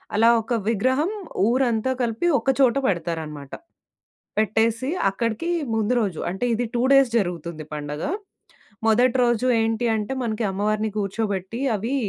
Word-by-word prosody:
అలా 225 +2 +5
ఒక 225 +2 -3
విగ్రహం 260 - +1 0.4
ఊరంతా 245 0 +1
కలిపి 235 +7 0
ఒక - - -2
చోట 260 -3 +5
పెడతారనమాట. 160 - -3 0.9
పెట్టేసి 225 +4 +1 0.2
అక్కడికి 230 - -2 0.2
ముందు 220 +2 +1
రోజు 195 -8 -2
అంటే 190 +7 -2
ఇది 240 +2 0
2 240 - +1
డేస్ 275 -2 +6
జరుగుతుంది 170 -5 -3
పండగ. 150 +1 -5 0.8
మొదటి 240 +3 +4
రోజు 240 0 +2
ఏంటి 225 +1 0
అంటే 215 +3 -2
మనకి 225 -1 -2
అమ్మవారిని 215 +2 -1
కూర్చోబెట్టి 200 +1 -2 0.2
అవి 225 +7 -3
220 Hz, 130 wpm, -23 LUFS, 195-240 Hz, 0.9 s, డేస్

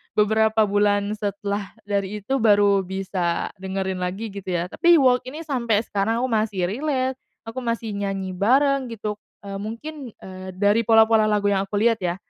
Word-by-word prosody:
beberapa 220 0 +3
bulan 205 0 +1
setelah 200 -1 -3 0.2
dari 200 0 -2
itu 235 +7 -2
baru 205 -2 +4
bisa 185 -2 -2
dengerin 190 -1 -3
lagi 195 +5 -4
gitu 195 -2 -6
ya, 175 +1 -2
tapi 345 0 +5
Walk 255 -4 +3
ini 300 +5 -7
sampai 235 -8 0
sekarang 225 +3 -1
aku 260 - 0
masih 215 -4 0
relate, 260 +1 -1 0.2
aku 225 +3 -6
masih 230 -2 -3
nyanyi 195 -2 -3
bareng 265 +8 +2
gitu, 210 -2 -5 0.2
eee, 195 -1 -6
mungkin, 240 +4 -7
eee, 185 0 -10
dari 205 +4 +2
pola-pola 225 -1 +5
lagu 205 -1 +1
yang 195 0 0
aku 205 - -5
liat 225 +2 +2
ya, 175 -2 -1
210 Hz, 165 wpm, -23 LUFS, 195-230 Hz, 0.2 s, tapi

